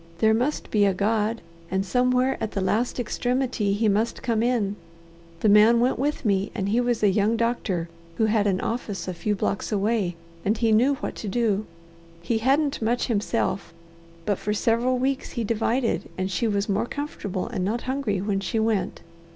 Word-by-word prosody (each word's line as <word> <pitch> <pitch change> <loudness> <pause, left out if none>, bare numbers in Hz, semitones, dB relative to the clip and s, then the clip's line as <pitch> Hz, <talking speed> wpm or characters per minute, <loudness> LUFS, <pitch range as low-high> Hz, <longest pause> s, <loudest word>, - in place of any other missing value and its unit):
"There 220 +5 +4
must 250 +7 -1
be 210 -2 +3
a 195 -2 +2
God, 215 +3 0 0.3
and 190 +1 0
somewhere 250 +5 +2
at 220 - -3
the - - -1
last 220 +7 0
extremity 245 -3 0
He 220 +2 +1
must 215 +3 0
come 230 -3 +1
in. 230 -4 +1 0.7
The - - +3
man 215 +3 +6
went 245 +1 +1
with 285 0 -1
me, 195 -2 +1
and 200 -3 -1
he 230 +4 +2
was 240 -2 0
a 205 - +5
young 210 +3 +2
doctor 220 -7 -1 0.3
who 220 - +3
had 215 -1 +2
an 190 -2 +1
office 205 -6 -3
a 185 - -2
few 210 +4 -1
blocks 200 +2 -2
away, 205 -3 0 0.3
and 210 +3 +1
he 225 -1 +2
knew 250 +6 +4
what - - -5
to 215 - -5
do. 215 -1 0 0.6
He 225 +6 0
hadn't 275 +4 +1
much 235 +2 +1
himself, 205 -5 -1 0.5
but 205 -2 0
for 210 - -1
several 235 +4 +2
weeks 265 +2 -1
he 235 - -2
divided 230 +3 0
and 185 +1 -2
she 230 +5 0
was 200 -1 0
more 210 +3 0
comfortable 225 -11 -4
and 205 -6 -2
not 220 +5 -1
hungry 255 -7 -1
when 200 -1 0
she 195 +3 -2
went. 220 -2 0
220 Hz, 190 wpm, -25 LUFS, 200-240 Hz, 0.7 s, man